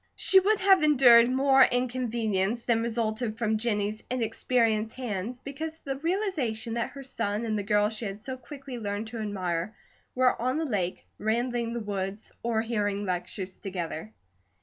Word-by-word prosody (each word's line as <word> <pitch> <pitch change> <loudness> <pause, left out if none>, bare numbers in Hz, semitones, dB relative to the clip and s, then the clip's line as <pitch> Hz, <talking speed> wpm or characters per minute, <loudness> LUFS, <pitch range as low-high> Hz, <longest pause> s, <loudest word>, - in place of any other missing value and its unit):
She 385 - +5
would 415 +3 +2
have 385 -2 +6
endured 250 -6 +7
more 270 +1 +4
inconvenience 235 -4 +1
than 230 -2 +2
resulted 225 -1 -1
from 220 -2 0
Jennie's 210 -2 -1
inexperienced 225 -2 0
hands 240 -1 -4
because 310 +4 -6
of - - -35
the 270 -1 -3
realization 290 - -1
that 235 0 -1
her 275 -1 -9
son 230 -4 -2
and 220 -1 -1
the 210 - 0
girl 210 0 +2
she 220 +1 -4
had 200 0 -5
so 260 +4 -5
quickly 260 0 -9
learned 205 0 -3
to 230 0 -6
admire 190 -2 -2 0.4
were 255 -2 +3
on 255 +4 0
the 320 - 0
lake, 190 - -2
rambling 235 +1 0
the 235 - -2
woods, 200 -1 -4
or 230 -1 0
hearing 205 -3 -1
lectures 185 +1 -3
together. 170 - -5
230 Hz, 165 wpm, -28 LUFS, 210-255 Hz, 0.4 s, endured